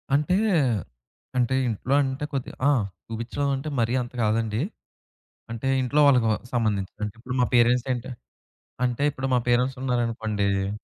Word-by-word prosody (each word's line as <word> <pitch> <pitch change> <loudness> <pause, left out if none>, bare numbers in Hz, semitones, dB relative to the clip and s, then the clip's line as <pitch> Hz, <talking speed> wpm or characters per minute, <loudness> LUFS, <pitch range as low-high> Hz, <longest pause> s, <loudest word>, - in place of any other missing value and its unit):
అంటే, 150 +6 +2 1.0
అంటే 125 +1 +2
ఇంట్లో 115 +4 -1
అంటే 135 +2 -2
కొద్దిగా 135 -2 -4
ఆ! - - +5 0.3
చూపిచ్చడం 115 +5 -2
అంటే 135 +3 -4
మరీ 115 +2 +1
అంత 120 +1 -7
కాదండి. 110 +1 0 0.9
అంటే 115 +3 -4
ఇంట్లో 140 +4 +1
వాళ్ళకి 125 -5 +4
వ - - +2 0.2
సంబంధించింది. 105 -3 -1
అంటే 105 +1 -6
ఇప్పుడు 125 +2 -5
మా - - +4
పేరెంట్స్ 120 +1 +4
ఏంటి 125 +2 -5 0.8
అంటే 125 +3 -1
ఇప్పుడు 135 0 -3
మా - - +4
పేరెంట్స్ 125 +2 +2
ఉన్నారనుకోండి 105 -5 -1
120 Hz, 145 wpm, -25 LUFS, 110-130 Hz, 1.0 s, ఆ